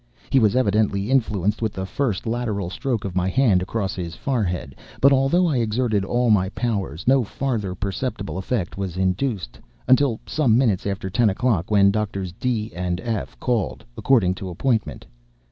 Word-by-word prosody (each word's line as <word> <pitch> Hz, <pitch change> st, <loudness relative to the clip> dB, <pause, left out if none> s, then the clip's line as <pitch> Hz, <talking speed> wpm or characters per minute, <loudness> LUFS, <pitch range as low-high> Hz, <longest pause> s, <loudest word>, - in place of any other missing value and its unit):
He 135 Hz, -, +5 dB
was 110 Hz, -1 st, +3 dB
evidently 105 Hz, -2 st, +1 dB
influenced 105 Hz, -5 st, +1 dB
with 110 Hz, -2 st, -1 dB
the 95 Hz, -, -4 dB
first 110 Hz, -1 st, -2 dB
lateral 110 Hz, -6 st, -2 dB
stroke 120 Hz, -1 st, -2 dB
of 95 Hz, -2 st, -5 dB
my 90 Hz, 0 st, +1 dB
hand 105 Hz, -4 st, +3 dB
across 95 Hz, +1 st, -2 dB
his 85 Hz, -2 st, -5 dB
forehead; 90 Hz, -, -2 dB, 0.2 s
but 140 Hz, +1 st, +6 dB
although 135 Hz, +7 st, +3 dB
I 155 Hz, -6 st, +1 dB
exerted 110 Hz, -2 st, 0 dB
all 120 Hz, +3 st, +1 dB
my 95 Hz, -3 st, +3 dB
powers, 100 Hz, -, -3 dB
no 130 Hz, 0 st, +5 dB
further 110 Hz, -5 st, -3 dB
perceptible 100 Hz, 0 st, -3 dB
effect 95 Hz, -2 st, -3 dB
was 95 Hz, -3 st, -4 dB
induced 95 Hz, -, -1 dB, 0.3 s
until 130 Hz, -3 st, +4 dB
some 130 Hz, -8 st, +2 dB
minutes 110 Hz, -8 st, +1 dB
after 95 Hz, -1 st, -3 dB
ten 110 Hz, +3 st, +3 dB
o'clock, 100 Hz, -3 st, 0 dB
when 100 Hz, -2 st, +5 dB
Doctors 100 Hz, -3 st, -2 dB
D—— 110 Hz, +2 st, -2 dB
and 90 Hz, +1 st, -2 dB
F—— 105 Hz, -, -4 dB
called, 120 Hz, -, -1 dB
according 110 Hz, -9 st, +3 dB
to 95 Hz, -, -4 dB
appointment. 110 Hz, +5 st, -1 dB
105 Hz, 165 wpm, -23 LUFS, 95-125 Hz, 0.3 s, but